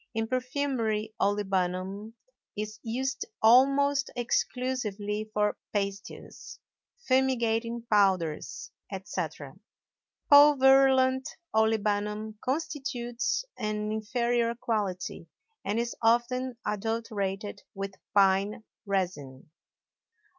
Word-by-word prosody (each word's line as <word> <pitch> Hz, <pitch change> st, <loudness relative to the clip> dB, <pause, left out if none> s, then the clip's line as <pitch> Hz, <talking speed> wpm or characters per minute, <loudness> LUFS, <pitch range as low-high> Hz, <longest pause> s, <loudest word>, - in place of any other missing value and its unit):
In 225 Hz, 0 st, -1 dB
perfumery 250 Hz, -4 st, -1 dB
olibanum 195 Hz, +1 st, -1 dB, 0.4 s
is 215 Hz, +1 st, -5 dB
used 260 Hz, +4 st, -2 dB, 0.2 s
almost 275 Hz, +4 st, +4 dB
exclusively 220 Hz, -4 st, -2 dB
for 210 Hz, -1 st, 0 dB, 0.2 s
pastils, 200 Hz, -1 st, -5 dB, 0.5 s
fumigating 235 Hz, -3 st, +1 dB
powders, 190 Hz, -7 st, +1 dB, 0.2 s
etc. 165 Hz, -7 st, -5 dB, 0.7 s
Pulverulent 265 Hz, -2 st, +6 dB, 0.3 s
olibanum 215 Hz, -1 st, 0 dB
constitutes 260 Hz, -, -2 dB
an 215 Hz, -1 st, -2 dB
inferior 235 Hz, +2 st, 0 dB
quality 200 Hz, -7 st, -3 dB, 0.4 s
and 205 Hz, +3 st, -1 dB
is 235 Hz, 0 st, -2 dB
often 240 Hz, +2 st, +1 dB
adulterated 210 Hz, -2 st, -3 dB
with 195 Hz, 0 st, -4 dB, 0.2 s
pine 200 Hz, +3 st, +3 dB, 0.2 s
resin. 155 Hz, -9 st, -3 dB
220 Hz, 75 wpm, -28 LUFS, 200-250 Hz, 0.7 s, Pulverulent